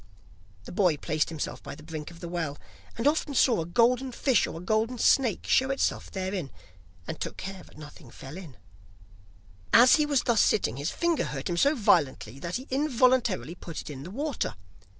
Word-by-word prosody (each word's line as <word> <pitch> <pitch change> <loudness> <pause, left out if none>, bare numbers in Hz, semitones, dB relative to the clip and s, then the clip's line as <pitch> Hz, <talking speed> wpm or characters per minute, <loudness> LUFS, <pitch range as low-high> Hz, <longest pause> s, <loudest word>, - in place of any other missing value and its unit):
The - - -10
boy 175 -5 +2
placed 155 +1 -1
himself 160 -2 -5
by - - -8
the 155 - -14
brink 155 -1 -7
of 170 -1 -14
the 170 - -5
well, 165 -4 -3 0.4
and 230 - -3
often 295 -1 +1
saw 235 -6 +4
a 160 - -5
golden 245 +7 +2
fish 250 -2 +2
or - - -7
a 180 - -10
golden 220 +4 0
snake 240 -2 +2
show 265 +1 +3
itself 270 - -1
therein, 190 -5 -3 0.6
and - - -5
took - - -5
care 195 -1 -7
that - - -17
nothing 150 -2 -12
fell 135 +5 -10
in. 165 - -10 1.1
As 245 +6 +7
he 300 -1 +1
was 285 -4 +2
thus 235 -3 +3
sitting, 130 - +1
his 145 +4 -2
finger 340 -2 0
hurt 135 +1 -4
him 170 - -1
so 285 - +4
violently 140 - +1
that 170 +4 -4
he 255 - -4
involuntarily 255 - +2
put 170 -2 -8
it - - -7
in 135 -2 -8
the 160 - -8
water. 280 - -3
190 Hz, 195 wpm, -27 LUFS, 155-255 Hz, 1.1 s, As